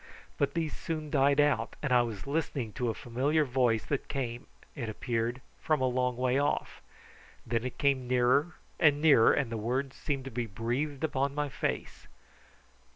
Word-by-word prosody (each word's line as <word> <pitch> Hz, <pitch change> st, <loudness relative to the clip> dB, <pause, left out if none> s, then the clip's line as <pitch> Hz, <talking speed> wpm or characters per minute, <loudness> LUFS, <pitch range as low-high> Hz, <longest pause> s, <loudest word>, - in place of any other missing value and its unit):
But 140 Hz, -, +1 dB
these 160 Hz, -2 st, -1 dB
soon 155 Hz, -2 st, -4 dB
died 140 Hz, 0 st, +3 dB
out, 140 Hz, -6 st, +2 dB
and 135 Hz, -4 st, +1 dB
I 125 Hz, -, +6 dB
was 115 Hz, -5 st, -4 dB
listening 140 Hz, -6 st, -2 dB
to 125 Hz, -2 st, -1 dB
a 110 Hz, -, -2 dB
familiar 140 Hz, +6 st, 0 dB
voice 120 Hz, -4 st, +1 dB
that 145 Hz, -, -2 dB
came, 120 Hz, -3 st, -4 dB, 0.3 s
it 120 Hz, -7 st, -4 dB
appeared, 115 Hz, +2 st, -2 dB, 0.2 s
from 155 Hz, -2 st, +1 dB
a 130 Hz, -, +1 dB
long 125 Hz, -1 st, 0 dB
way 130 Hz, +1 st, +2 dB
off; 145 Hz, -, -1 dB, 0.6 s
then 115 Hz, 0 st, -1 dB
it 130 Hz, -, -5 dB
came 135 Hz, -3 st, +1 dB
nearer 125 Hz, +6 st, +2 dB, 0.2 s
and 150 Hz, -3 st, +5 dB
nearer, 145 Hz, -7 st, +6 dB
and 135 Hz, -5 st, 0 dB
the 115 Hz, -, -2 dB
words 130 Hz, +5 st, -2 dB
seemed 135 Hz, -3 st, -3 dB
to 135 Hz, -, -6 dB
be 120 Hz, 0 st, -2 dB
breathed 125 Hz, +7 st, -3 dB
upon 140 Hz, -2 st, 0 dB
my 145 Hz, -1 st, -1 dB
face. -, -, -4 dB
130 Hz, 175 wpm, -30 LUFS, 120-145 Hz, 0.6 s, I